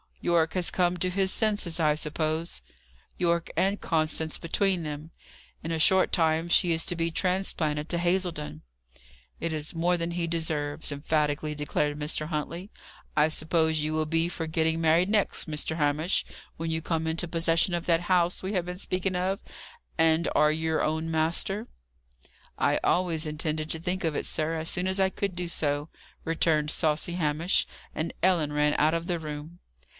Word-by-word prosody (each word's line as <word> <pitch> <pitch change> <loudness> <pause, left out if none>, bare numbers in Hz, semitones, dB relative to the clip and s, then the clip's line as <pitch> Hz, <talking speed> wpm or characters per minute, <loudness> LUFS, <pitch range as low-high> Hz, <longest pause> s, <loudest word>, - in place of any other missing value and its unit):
"Yorke 165 -2 +2
has 180 -2 0
come 180 -1 +1
to 185 +1 0
his 190 +1 +1
senses, 205 -6 +1
I 155 -2 +4
suppose?" 155 +2 -2 0.6
"Yorke 170 -1 +1
and 195 +2 +1
Constance 155 -1 0
between 185 +2 0
them. 150 +1 -6 0.5
In 165 - -3
a 165 - -1
short 190 +4 +5
time 160 0 +2
she 170 0 +4
is 160 0 0
to 175 - -1
be 165 0 0
transplanted 160 -4 0
to 170 - 0
Hazledon." 175 - -1 0.8
"It 165 - -2
is 155 +1 -3
more 175 +2 +2
than 170 0 -2
he 170 0 -1
deserves," 155 -2 -1
emphatically 150 +1 0
declared 145 0 -1
Mr. 150 +1 -1
Huntley. 170 +5 -4 0.4
"I 150 0 +5
suppose 160 0 +1
you 155 +1 -1
will 155 0 +1
be 165 +1 +2
for 170 -1 -4
getting 160 0 +1
married 165 +3 +3
next, 210 -5 +1
Mr. 155 +1 -2
Hamish, 150 +4 +1 0.3
when 165 0 -3
you 160 0 -1
come 160 -1 -1
into 165 +2 -1
possession 165 +1 +2
of 170 0 -2
that 165 -1 +3
house 175 0 +2
we 190 +2 -2
have 180 -3 0
been 180 0 -6
speaking 185 -1 -1
of, 190 +3 -1 0.6
and 160 +1 +4
are 150 0 +5
your 160 0 0
own 160 +1 -1
master?" 170 +7 0 0.9
"I - - +3
always 170 -3 +1
intended 155 0 -2
to 160 - -2
think 180 +3 -2
of 160 -3 0
it, - - -2
sir, 155 +1 -1
as 160 0 -2
soon 180 +1 0
as 190 +1 +1
I 190 0 +4
could 195 -1 -3
do 175 0 -3
so," 145 -2 -1 0.4
returned 160 -2 +1
saucy 155 +2 +1
Hamish. 165 +1 +1 0.3
And 160 +2 -3
Ellen 170 -5 +3
ran 150 0 +2
out 155 +2 +3
of 165 0 -2
the 175 -2 -1
room. 155 +2 -7
165 Hz, 175 wpm, -27 LUFS, 155-175 Hz, 0.9 s, short